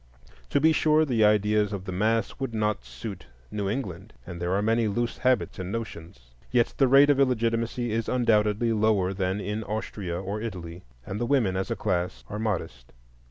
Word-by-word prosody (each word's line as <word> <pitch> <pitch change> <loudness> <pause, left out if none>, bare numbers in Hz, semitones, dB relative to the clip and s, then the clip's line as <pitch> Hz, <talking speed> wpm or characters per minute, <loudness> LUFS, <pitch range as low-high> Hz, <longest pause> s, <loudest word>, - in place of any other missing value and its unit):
To - - +2
be 160 +3 +5
sure, 155 0 +3
the 120 -6 +2
ideas 105 0 +3
of 95 -2 -5
the 95 - -4
mass 110 +3 0
would 135 -4 -3
not 105 -1 0
suit 105 - -8 0.2
New 100 -2 -2
England, 100 -4 -5
and 85 -1 -8
there 90 +2 0
are 100 - +1
many 115 +1 +2
loose 120 +3 -2
habits 130 -5 +1
and 90 0 -4
notions. 85 - -7 0.2
Yet 120 - +2
the 135 - +4
rate 140 +3 +7
of 140 - +1
illegitimacy 115 -2 +1
is 115 0 -1
undoubtedly 115 -2 +2
lower 105 -3 +2
than 95 +1 -1
in 105 +2 -3
Austria 100 -4 -4
or 100 +3 -4
Italy, 90 -6 -6 0.2
and 100 - -5
the 120 - 0
women 120 -9 +2
as 95 +3 -2
a 115 - -1
class 90 -5 -2
are 105 - -4
modest. 85 - -3
105 Hz, 190 wpm, -26 LUFS, 95-115 Hz, 0.2 s, rate